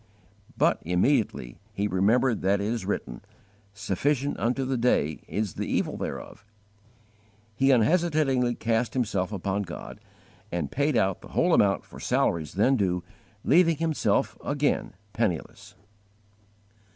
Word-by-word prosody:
But - - +2
immediately 90 - 0
he 105 0 -1
remembered 110 +6 +2
that 95 +2 +2
it 100 - -2
is 110 -3 -2
written: - - -3 0.5
"SUFFICIENT 140 +8 -1
UNTO 125 +3 0
THE 130 0 -1
DAY 80 -11 +1
is 105 -4 -2
THE - - -4
EVIL - - -2
THEREOF."* - - -6 1.1
He 135 +6 +2
unhesitatingly 135 -1 +2
cast 115 +2 -1
himself 100 -6 -1
upon 100 0 -2
God, 85 -3 -8 0.5
and 85 - -3
paid 140 -2 +1
out 95 -4 +1
the - - -11
whole - - +3
amount - - +3
for - - -12
salaries 80 -4 0
then 130 +7 +3
due, 90 -4 0 0.4
leaving 165 +1 +4
himself 160 -2 0
again 145 -6 -1 0.2
penniless. 100 -8 -3
110 Hz, 125 wpm, -26 LUFS, 95-135 Hz, 1.1 s, leaving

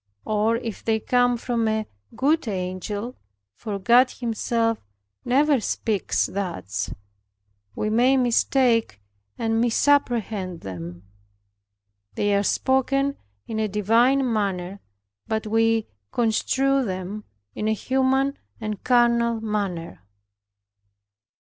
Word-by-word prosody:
Or 215 +2 +1
if 230 -3 -5
they 220 -1 +1
come 245 +1 +2
from 235 -1 -1
a 220 0 0 0.3
good 300 +1 +1
angel 200 +4 -4 0.4
(for 205 - -5
God 240 +6 +5
Himself 230 -1 -1 0.4
never 280 +2 +3
speaks 190 - 0
thus) 165 - -4 0.8
we 215 - -1
may 250 +4 +4
mistake 240 - +2 0.4
and 225 0 0
misapprehend 230 - +1
them. 90 -1 -8 1.1
They 205 0 +1
are 200 - +3
spoken 275 +5 +1 0.3
in 220 - -4
a 215 - +1
divine 230 +7 +3
manner, 195 -2 -2 0.5
but 220 0 -2
we 225 0 +2 0.3
construe 265 +4 +1
them 190 0 -4 0.3
in 215 - -3
a 220 - +2
human 265 +4 +1 0.2
and 215 -3 -5
carnal 235 -2 +3
manner. 200 - -3
225 Hz, 105 wpm, -24 LUFS, 205-245 Hz, 1.1 s, God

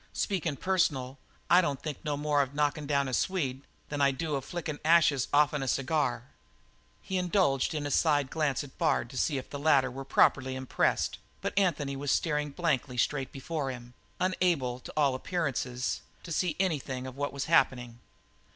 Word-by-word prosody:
Speakin' 175 -7 -1
personal, 140 -7 0 0.3
I 180 +1 +6
don't 145 -6 -1
think 150 -3 -6
no 150 -2 -1
more 145 0 +2
of 140 0 -3
knockin' 150 0 0
down 140 -1 +1
a 130 - -4
Swede 135 -4 0 0.3
than 145 -1 -2
I 140 - +5
do 150 +3 -3
of 135 -2 -1
flickin' 155 -1 -4
the - - -4
ashes 155 -6 +4
off'n 150 0 +3
a 135 - -3
cigar." 135 -2 0 0.8
He 190 -1 -1
indulged 175 -7 +1
in 150 -1 -2
a 145 - -2
side 145 -3 +2
glance 150 -4 0
at 140 - -14
Bard 155 -7 +1
to 130 - -8
see 145 - +1
if 130 - -7
the 145 - -5
latter 140 -3 +3
were 135 +2 -6
properly 130 -1 +3
impressed, 130 -1 0 0.2
but - - -3
Anthony 150 -8 +1
was 140 +1 -4
staring 150 -2 +1
blankly 140 -5 -1
straight 135 +1 0
before 140 +1 -3
him, 120 -1 -8 0.3
unable, 175 -9 +1
to - - -10
all 140 -3 +3
appearances, 130 -4 -2 0.2
to 170 - -8
see 165 0 0
anything 140 -8 -1
of 130 -1 -7
what 145 +1 -2
was 140 -1 -3
happening. 125 -6 +2
145 Hz, 185 wpm, -29 LUFS, 130-160 Hz, 0.8 s, I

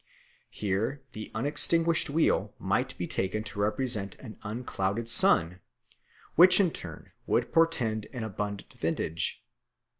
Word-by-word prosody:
Here 110 +8 -2
the 110 0 -8
unextinguished 160 +6 +1
wheel 160 +3 +1
might - - -1
be - - -3
taken 105 +3 -2
to 105 -1 -7
represent 105 -2 +2
an 110 -5 -12
unclouded 110 -1 -3
sun, 90 -6 +4 0.7
which 180 +4 +7
in 185 -4 +3
turn 80 - -9 0.2
would - - 0
portend 120 -10 +1
an 125 -4 -5
abundant 105 -1 -5
vintage. 80 +2 -2
110 Hz, 120 wpm, -28 LUFS, 100-140 Hz, 0.7 s, which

